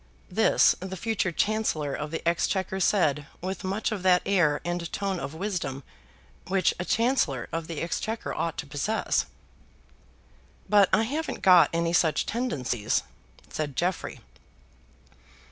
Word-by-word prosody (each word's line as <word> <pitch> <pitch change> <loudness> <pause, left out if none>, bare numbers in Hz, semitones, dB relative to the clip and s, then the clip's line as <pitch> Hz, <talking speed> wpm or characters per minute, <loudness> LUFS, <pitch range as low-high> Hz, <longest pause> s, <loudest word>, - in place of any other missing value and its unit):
This - - +4
the 190 +1 -6
future 215 -2 -1
Chancellor 170 -6 0
of 150 +2 -4
the 165 +1 -4
Exchequer 190 +3 0
said 150 -7 +2
with 190 +3 -5
much 195 +5 -1
of 210 -3 -3
that 180 -1 +4
air 170 -7 +3
and 175 -1 -3
tone 195 -2 -2
of 155 - -6
wisdom 165 -8 -3 0.6
which 185 -2 +2
a 175 - -2
Chancellor 225 - +1
of 165 0 -3
the 165 -3 -5
Exchequer 220 +6 -3
ought 165 -1 -2
to - - -4
possess. 145 +11 -1 1.4
"But 205 -2 +5
I 220 - +4
haven't 295 +7 -3
got 180 -3 +7
any 170 0 0
such 160 -3 +2
tendencies," 140 - -1 0.5
said 150 -3 -3
Jeffrey. 180 +3 -2
180 Hz, 135 wpm, -27 LUFS, 155-200 Hz, 1.4 s, got